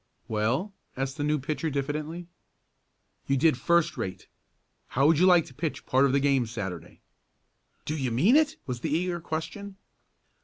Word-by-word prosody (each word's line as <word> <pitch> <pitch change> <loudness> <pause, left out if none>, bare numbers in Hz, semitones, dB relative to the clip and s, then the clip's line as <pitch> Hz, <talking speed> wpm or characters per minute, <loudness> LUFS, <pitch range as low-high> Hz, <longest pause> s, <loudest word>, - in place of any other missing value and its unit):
"Well?" 120 - -1 0.2
asked 135 0 -3
the 145 - -2
new 150 +1 +1
pitcher 150 +3 -2
diffidently. 150 +4 -3 1.0
"You 135 - +2
did 155 +1 +4
first 170 +6 +2
rate. 95 -1 -5 0.6
How 135 +2 +1
would 155 0 +5
you 185 - +5
like 175 -3 +6
to - - -14
pitch 155 +3 -4
part 130 +2 +3
of 135 - +2
the 140 - +3
game 135 -3 +2
Saturday?" 95 -7 -6 0.8
"Do 155 - -2
you 135 -4 -1
mean 155 - +4
it?" 310 -1 +3
was 125 -3 -4
the 155 - -3
eager 175 +3 0
question. 190 +6 -5
145 Hz, 165 wpm, -27 LUFS, 130-165 Hz, 1.0 s, like